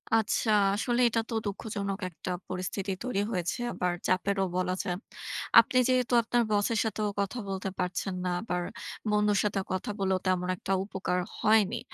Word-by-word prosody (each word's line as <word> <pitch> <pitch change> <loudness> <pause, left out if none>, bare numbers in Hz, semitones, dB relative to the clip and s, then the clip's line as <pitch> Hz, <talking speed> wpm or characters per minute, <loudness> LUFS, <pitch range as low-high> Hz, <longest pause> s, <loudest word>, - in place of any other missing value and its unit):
আচ্ছা, 225 0 +1 0.3
আসলে 240 +3 +1
এটা 230 0 +1
তো - - -4
দুঃখজনক 200 -1 -3
একটা 180 +1 -6 0.2
পরিস্থিতি 185 +2 -3
তৈরি 250 -5 0
হয়েছে, 180 +3 -1
আবার 180 -1 0
চাপেরও 195 +1 +1
বলা 185 0 +1
যায়। 180 -1 -2 0.6
আপনি 255 - +1
যেহেতু 255 -1 +2
আপনার 240 +1 +2
boss 205 -1 +3
এর 225 - +1
সাথেও 215 -1 -1
কথা 200 +5 -2
বলতে 195 0 -3
পারছেন 185 +1 -2
না, 180 - 0
আবার 180 -5 -2 0.5
বন্ধুর 210 -1 +3
সাথে 205 -1 0
কথা 185 +2 -2
বলেও 190 -1 +2
তেমন 185 -1 +1
একটা 195 +2 -3
উপকার 190 -2 -2 0.2
হয়নি। 220 +1 +3
200 Hz, 160 wpm, -29 LUFS, 185-220 Hz, 0.6 s, boss